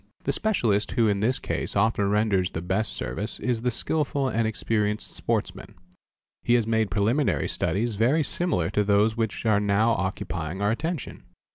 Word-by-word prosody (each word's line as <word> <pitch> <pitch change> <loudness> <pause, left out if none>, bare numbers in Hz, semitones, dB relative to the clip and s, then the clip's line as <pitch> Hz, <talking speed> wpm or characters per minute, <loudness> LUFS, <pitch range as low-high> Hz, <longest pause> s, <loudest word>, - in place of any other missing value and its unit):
| - - -39
The - - 0
specialist 115 - +1
who 115 -3 +3
in 100 -1 +1
this 115 +5 +1
case - - -3
often 100 -1 +2
renders 100 -3 +2
the 80 - -5
best 95 +4 -1
service 100 - -4
is 120 -3 -1
the 125 - +1
skilful 140 +1 -1
and 115 -2 0
experienced 105 -1 -1
sportsman. 100 -3 -3 0.7
He 120 - +3
has 120 -3 +2
made 110 -2 +1
preliminary 110 +9 +1
studies 100 +6 -1
very 130 +9 +3
similar 145 - 0
to 105 - +2
those 105 +2 +3
which 115 0 -2
are 110 -2 +4
now 105 +3 +2
occupying 95 -4 -3
our 100 +1 +1
attention. 155 +3 -4
110 Hz, 170 wpm, -25 LUFS, 100-120 Hz, 0.7 s, are